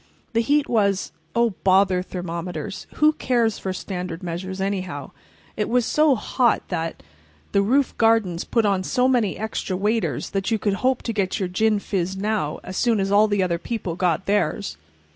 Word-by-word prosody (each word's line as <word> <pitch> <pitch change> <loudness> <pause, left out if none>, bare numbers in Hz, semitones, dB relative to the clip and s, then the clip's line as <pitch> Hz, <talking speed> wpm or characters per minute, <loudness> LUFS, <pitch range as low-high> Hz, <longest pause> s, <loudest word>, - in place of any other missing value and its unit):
The 230 - +3
heat 285 +5 +2
was—oh, 200 0 0
bother 190 -1 +4
thermometers!—who 180 - -2
cares 235 -4 +1
for 190 - -3
standard 180 -2 -5
measures, 185 +2 -4
anyhow? 185 -8 -3 0.4
It 210 - -1
was 245 0 +2
so 300 0 +4
hot 240 +2 +1
that— 165 -2 -3 0.5
The 200 - +3
roof 260 +6 +2
gardens 225 -7 +3
put 230 -2 +1
on 195 -2 +2
so 250 +6 +1
many 240 -7 +1
extra 205 -3 -3
waiters 205 -4 -1
that 195 +1 -1
you 225 - +2
could 205 -1 0
hope 260 -1 +1
to 230 - -2
get 195 -1 -1
your 185 -3 -1
gin 215 +4 +2
fizz 190 -2 -2
now—as 190 -3 -2
soon 235 -4 +2
as 195 0 0
all 210 +2 +5
the 205 -2 +1
other 170 -2 0
people 195 -5 -4
got 180 0 0
theirs. 205 0 0
200 Hz, 165 wpm, -23 LUFS, 185-225 Hz, 0.5 s, all